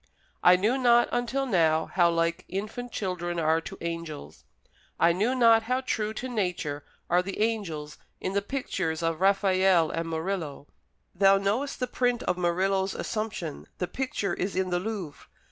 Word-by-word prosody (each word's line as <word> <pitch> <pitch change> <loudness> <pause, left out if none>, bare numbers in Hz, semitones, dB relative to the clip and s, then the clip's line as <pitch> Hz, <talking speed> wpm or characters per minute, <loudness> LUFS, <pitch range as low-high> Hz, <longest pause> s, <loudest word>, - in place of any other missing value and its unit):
I 180 - +7
knew 220 +8 +1
not 240 -1 +5
until 245 +3 -1
now 160 -8 +2
how 175 -1 +4
like 170 0 0
infant 215 +6 -5
children 175 -3 -3
are 160 0 +2
to - - -8
angels. 165 -3 -6 0.5
I 170 - +5
knew 215 +8 +1
not 230 -3 +6
how 255 +1 +1
true 215 -4 -1
to 255 - -4
nature 180 - -2 0.2
are 175 +1 +3
the 195 +1 -6
angels 185 -10 -2 0.2
in 185 - -3
the 200 - +1
pictures 190 -9 -3
of 165 +1 -1
Raffaelle 190 -3 +3
and 165 0 -3
Murillo. 160 -3 -3 0.5
Thou 195 +1 +5
knowest 215 +9 -1
the 250 - +1
print 245 -1 0
of 180 - 0
Murillo's 190 +2 0
Assumption; 215 -8 -4
the 180 - -2
picture 210 -7 -2
is 190 +2 -3
in 185 -1 0
the 175 - +1
Louvre. 185 - -6
190 Hz, 160 wpm, -27 LUFS, 170-220 Hz, 0.5 s, I